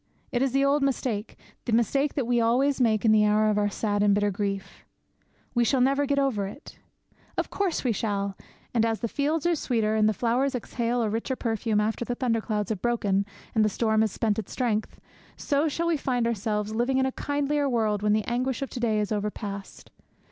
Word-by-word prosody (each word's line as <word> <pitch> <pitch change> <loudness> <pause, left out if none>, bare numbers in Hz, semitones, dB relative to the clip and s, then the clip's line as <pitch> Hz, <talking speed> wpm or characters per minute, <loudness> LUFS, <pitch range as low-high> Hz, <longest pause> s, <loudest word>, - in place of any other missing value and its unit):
It 245 - 0
is 270 -1 +2
the 275 +1 +2
old 285 +1 +3
mistake, 250 -5 -1 0.3
the - - -2
mistake 270 +6 +2
that 275 - 0
we 240 0 +2
always 260 +4 +2
make 220 -2 +2
in 220 - +6
the 215 -1 +5
hour 215 +1 +3
of 210 - +1
our 205 0 +2
sad 205 0 -1
and 205 -1 +4
bitter 205 0 +1
grief. 195 0 -4 0.7
'We 240 - +3
shall 260 +3 +2
never 275 +3 +2
get 280 0 +1
over 250 -8 +1
it!' 275 +10 -11 0.6
Of - - -1
course 390 -4 -1
we 250 - +2
shall! 200 -2 -2 0.4
And 230 -2 +3
as 225 -1 0
the 235 - 0
fields 300 +6 -1
are 345 - +3
sweeter, 230 -8 0
and 215 0 +3
the - - +1
flowers 250 +5 +1
exhale 240 0 -1
a 220 - 0
richer 230 +4 -2
perfume, 225 -3 0
after 220 +3 0
the 245 0 -3
thunder 235 -3 0
clouds 210 -2 -2
have 215 -4 -3
broken 205 -5 +1 0.3
and 220 - +3
the 215 - +3
storm 220 +1 +1
has 220 -2 +1
spent 220 0 0
its 215 - -7
strength, 225 -4 -1 0.4
so 285 +1 +1
we - - +1
shall 335 +3 0
find 250 -4 0
ourselves 215 -1 -1
living 245 +4 +1
in 265 - +3
a 265 - 0
kindlier 285 +1 -1
world 215 -4 +1
when 210 0 +2
the 215 -1 +1
anguish 255 +2 -1
of 275 - -6
to 250 - -5
day 220 -3 +1
is 210 0 -2
over 210 0 0
past. 200 -2 -8
230 Hz, 220 wpm, -26 LUFS, 210-265 Hz, 0.7 s, in